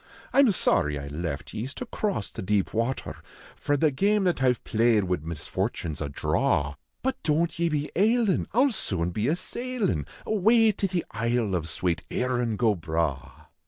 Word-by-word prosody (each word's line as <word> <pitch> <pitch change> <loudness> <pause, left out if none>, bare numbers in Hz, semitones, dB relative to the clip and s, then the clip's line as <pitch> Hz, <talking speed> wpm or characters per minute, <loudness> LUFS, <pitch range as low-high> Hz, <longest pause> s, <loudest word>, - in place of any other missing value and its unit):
I - - +4
m 270 -5 +7
sorry 75 - +2
I 70 - -6
left 75 -1 -4
ye 110 - -3
s 135 - -7
to 250 - -5
cross 205 - -2
the - - -6
deep 100 0 0
water, 115 +4 -2 0.4
For 145 - 0
the 155 +1 +3
game 200 +8 +2
that 180 -6 +1
I 130 -1 +5
ve - - -11
played 115 -1 +3
wid 90 -4 -1
misfortune 80 0 -3
s 75 - -8
a 75 - -2
draw; 70 +1 0 0.3
But 265 +1 -1
don 160 +2 +2
t 170 +1 -9
ye 170 - +3
be 150 -1 -2
ailin, 220 0 +2
I 235 - +3
ll 280 - +3
soon 90 - -2
be 105 +5 -1
a 155 - +2
sailin 200 - -2 0.2
Awav 220 +1 +4
to 195 - +1
the 180 -2 -2
isle 115 -2 0
of 85 -3 -1
swate 85 0 -1
" - - -40
Krin 120 -3 -1
go 115 -4 +3
Bragli." 80 -4 -3
125 Hz, 200 wpm, -26 LUFS, -, 0.4 s, m